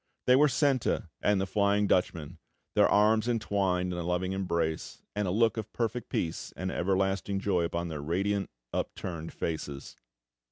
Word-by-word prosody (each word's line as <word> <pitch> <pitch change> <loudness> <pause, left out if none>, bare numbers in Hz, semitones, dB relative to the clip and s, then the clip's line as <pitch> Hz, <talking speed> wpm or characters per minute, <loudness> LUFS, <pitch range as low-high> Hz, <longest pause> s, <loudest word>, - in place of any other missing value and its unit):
They 125 - +6
were 150 +3 +6
Senta 130 - +1
and 105 -1 +3
the 95 - 0
Flying 100 +1 +2
Dutchman, 85 -6 0 0.3
their - - +5
arms 110 +2 +4
entwined 95 -6 0
in 90 - -3
a - - -2
loving 90 +2 -1
embrace, 85 -4 -2
and 105 -1 0
a - - 0
look 115 +4 +2
of 110 -1 -4
perfect 120 +1 -2
peace 80 - -2
and 95 +1 -2
everlasting 95 +1 0
joy 90 -4 +1
upon 85 +1 -2
their 75 -3 -4
radiant, 95 +5 0 0.2
upturned 85 -3 -4
faces. 75 -4 -4
95 Hz, 160 wpm, -29 LUFS, 85-105 Hz, 0.3 s, They